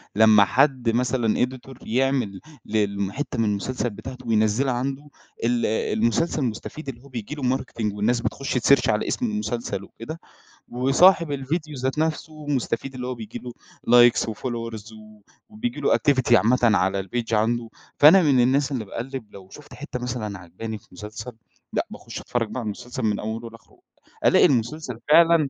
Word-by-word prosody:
لمّا 110 -1 +6
حد 130 0 +2
مثلًا 120 -1 +1
editor 130 +1 -11
يعمل 125 -5 0 0.3
لل 100 -2 -1
حِتّة 135 -2 -4
من 115 - +3
المسلسل 115 +5 -1
بتاعته 125 +3 -9
وينَزّلها 110 +4 +2
عنده 135 +4 -3 0.3
ال 120 0 +1
المسلسل 115 +8 0
مستفيد 130 +5 -5
اللي 120 -3 -8
هو - - -14
بييجي 120 +2 -6
له 130 -3 0
marketing 110 -5 -4
والناس 115 +4 +1
بتخُش 130 +4 -3
تسيرش 130 +2 +4
على 105 - +1
اسم 250 - -1
المسلسل 125 - -3
وكده 155 +11 -9 0.5
وصاحب 145 +7 +4
الفيديو 150 +3 -3
ذات 130 +3 -2
نفسه 155 -1 -3
مستفيد 135 -2 -2
اللي 125 -1 -5
هو 130 - -3
بييجي 110 -2 -8
له 125 -1 -7 0.6
likes - - -1
وfollowers 115 -1 -5 0.6
وبييجي 220 -3 -4
له 140 - +3
activity 130 -4 +2
عامة 120 +3 +4
ًعلى 95 -4 +3
الpage 115 +4 -3
عنده، 115 +2 +1 0.3
فأنا 160 +6 +8
من 140 -6 +3
الناس 135 +3 +2
اللي 125 -5 -2
باقَلّب 125 +4 -6
لو 95 -1 -12
شُفت 145 +7 -13
حتّة 145 -4 -6
مثلًا 120 -5 -4
عجباني 95 +6 -7
في - - -22
المسلسل 105 +5 -8 0.4
لأ - - 0
باخش - - -8
أتفرج 120 -2 -2
بقى 120 - -4
على 120 - -5
المسلسل 120 +4 -5
من 105 -2 +1
أوله 115 +2 -5
لآخره، 115 0 -18 0.5
ألاقي - - +6
المسلسل 125 0 0
فعلًا 165 -2 +6
125 Hz, 160 wpm, -24 LUFS, 110-135 Hz, 0.6 s, فأنا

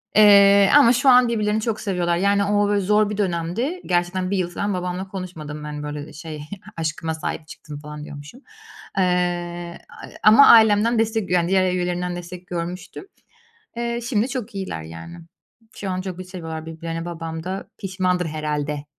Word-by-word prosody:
Eee, 200 -1 +7
ama 275 -5 +7
şu 265 +3 +3
an 250 -1 +7
birbirlerini 215 -2 0
çok 215 -1 -2
seviyorlar. 175 -4 0
Yani, 200 +2 +2
o 205 0 +2
böyle 205 0 +2
zor 210 +2 +2
bir 210 - -4
dönemdi, 200 - -2
gerçekten 180 +1 0
1 200 - +1
yıl 175 -1 -1
falan 200 +3 -2
babamla 180 +1 -3
konuşmadım, 160 -6 -7
hani, 150 0 -6
böyle, 150 0 -5
ııı, - - -12
şey, 155 -1 -8 0.4
"Aşkıma 160 0 -2
sahip 160 0 -5
çıktım." 150 -1 -10
falan 150 0 -9
diyormuşum. 150 - -11 0.6
Iıı, 175 -2 -1
a - - -13 0.2
ama 220 +7 +8
ailemden 220 +1 +6
destek 220 -4 -1
yani, 175 -1 +2
diğer 185 -1 +2
üyelerinden 180 0 -2
destek 175 +1 -9
görmüştüm. 180 - -6 0.7
Eee, 235 0 -2
şimdi 230 -1 +1
çok 245 -4 -5
iyiler, 190 - -4
yani. 80 - -10 0.6
Şu 195 - -4
an 185 0 -2
çok 185 -1 -6
bir 185 - -6
seviyorlar 165 -4 -7
birbirlerini, 165 +1 -5
babam 165 -1 -6
da 190 +2 -5
pişmandır 185 -2 -1
herhâlde. 150 -2 -3
180 Hz, 170 wpm, -22 LUFS, 165-205 Hz, 0.7 s, ama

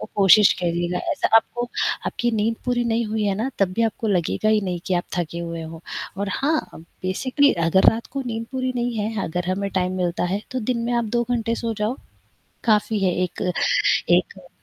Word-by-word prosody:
कोशिश 200 +1 +7
करिएगा 175 0 -1
ऐसा 285 - 0
आपको 240 +1 -1 0.4
आपकी 240 0 -1
नींद 220 +1 0
पूरी 245 -1 +1
नहीं 230 0 +1
हुई 215 0 -2
है 200 -1 +1
ना 225 +6 -1
तब 195 -2 +2
भी 230 - 0
आपको 225 0 -1
लगेगा 195 +2 +1
ही 215 -1 +3
नहीं 180 -3 -3
कि 185 - 0
आप 175 - 0
थके 170 0 -3
हुए 170 -1 -5
हों। 160 0 -8 0.4
और 200 - -1
हाँ 310 +3 +1
अ, - - -10
बेसिकली 225 - 0 0.2
अगर 190 +3 +6
रात 230 +1 -5
को 275 - -2
नींद 230 -1 -3
पूरी 255 -1 -1
नहीं 240 -1 -1
है 210 -1 -2
अगर 175 +2 -3
हमें 200 +1 -2
टाइम 185 0 0
मिलता 180 -1 -1
है, 195 +3 -1
तो 255 - -2
दिन 245 +2 -1
में 240 - -1
आप 235 -1 +1
2 240 - +2
घंटे 230 -1 0
सो 230 -1 -2
जाओ 220 +5 -1 0.7
काफ़ी 215 -1 +2
है 180 - +2
एक 180 +1 -2 0.6
एक 180 +1 +1
210 Hz, 205 wpm, -23 LUFS, 180-235 Hz, 0.7 s, कोशिश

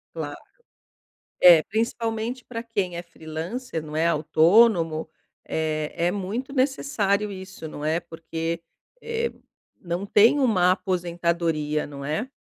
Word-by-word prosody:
Claro, - - -5 1.0
é 170 -3 +9
principalmente 230 +2 -2
pra 230 -2 -6
quem 200 -7 -2
é 175 - -4
freelancer 165 +5 -6
não 155 0 -7
é, 165 +1 +2
autônomo 165 +1 +4 0.4
é 155 -1 -2
é - - +3
muito 210 +8 -4
necessário 225 -7 +1
isso 190 -4 -8
não 150 0 -7
é? 160 +2 +1
Porque, 165 0 -5 0.4
eh, 465 0 -2 0.5
não 175 +2 -3
tem 225 +8 +5
uma 185 -8 +4
aposentadoria, 170 -5 -1
não 140 -1 -8
é? 155 - -2
175 Hz, 120 wpm, -25 LUFS, 160-225 Hz, 1.0 s, é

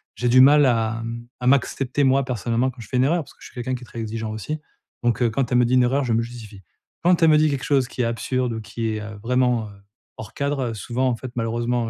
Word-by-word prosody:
j'ai 125 - 0
du 130 +2 +6
mal 145 +2 +7
à 115 -2 +1
m 115 +1 -6
à 125 - -1
m'accepter, 135 +1 +1
moi, 135 +1 +3
personnellement, 120 +1 -1
quand 125 - -18
je - - -10
fais 125 - -2
une 125 - +4
erreur, 165 +5 +2
parce - - -17
que - - -20
suis - - -12
quelqu'un 125 0 -3
qui 125 - -8
est - - -10
très 115 - -9
exigeant 110 0 -4
aussi. 110 +9 -5 0.4
Donc, 120 0 +1
heu, 120 - +3
quand 125 +2 -2
elle 125 - +4
me 125 - +4
dit 120 - 0
une 125 - +5
erreur, 135 +2 +1
je 120 - 0
me 115 - +2
justifie. 115 -4 -9 0.4
Quand 175 -1 +3
elle 165 - +6
me 155 - +6
dit 155 0 +3
quelque 140 -3 -3
chose 135 -3 +2
qui - - -4
est - - +1
absurde 120 +1 -1
ou 110 - -5
qui 115 +1 -4
est, 110 0 -3
heu, 105 0 -8
vraiment, 125 -2 +1
heu, - - -13 0.4
hors 110 -1 -9
cadre, 140 -4 -1
souvent, 125 +4 -1
en 120 - 0
fait, 130 +1 -8
malheureusement, 120 0 -1
125 Hz, 280 wpm, -22 LUFS, 115-130 Hz, 0.4 s, mal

